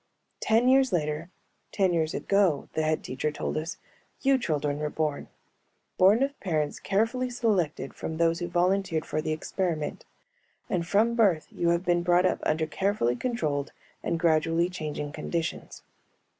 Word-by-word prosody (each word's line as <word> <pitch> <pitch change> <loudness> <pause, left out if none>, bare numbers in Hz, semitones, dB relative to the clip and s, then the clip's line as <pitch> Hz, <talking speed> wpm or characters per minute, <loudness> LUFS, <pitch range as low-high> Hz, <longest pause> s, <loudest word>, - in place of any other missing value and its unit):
"Ten 225 +3 +3
years 265 -1 +5
later, 155 -1 -1 0.4
ten 190 -3 +2
years 160 -2 0
ago," 195 -7 +2
the 160 - 0
Head 155 0 0
Teacher 130 +4 -2
told 150 - -4
us, 165 +6 -3 0.5
"you 270 -1 +4
children 145 - -1
were 150 0 -1
born. 150 -2 -2 0.7
Born 205 +7 +6
of 280 +1 -3
parents 155 -6 -1
carefully 230 +6 0
selected 195 - -1
from 160 - -5
those 165 0 +2
who 175 - -3
volunteered 175 -1 +1
for 155 - -2
the 155 - -2
experiment. 155 -1 -2 0.7
And 170 -2 0
from 220 +5 +3
birth 200 -9 +3
you 170 - 0
have 170 +2 +1
been 175 -1 +2
brought 175 +1 +3
up - - +1
under 160 +1 +1
carefully 190 - 0
controlled 150 - -2 0.3
and 165 - -1
gradually 165 +1 +2
changing 150 -4 -4
conditions. 160 +2 -4
170 Hz, 155 wpm, -27 LUFS, 155-200 Hz, 0.7 s, Born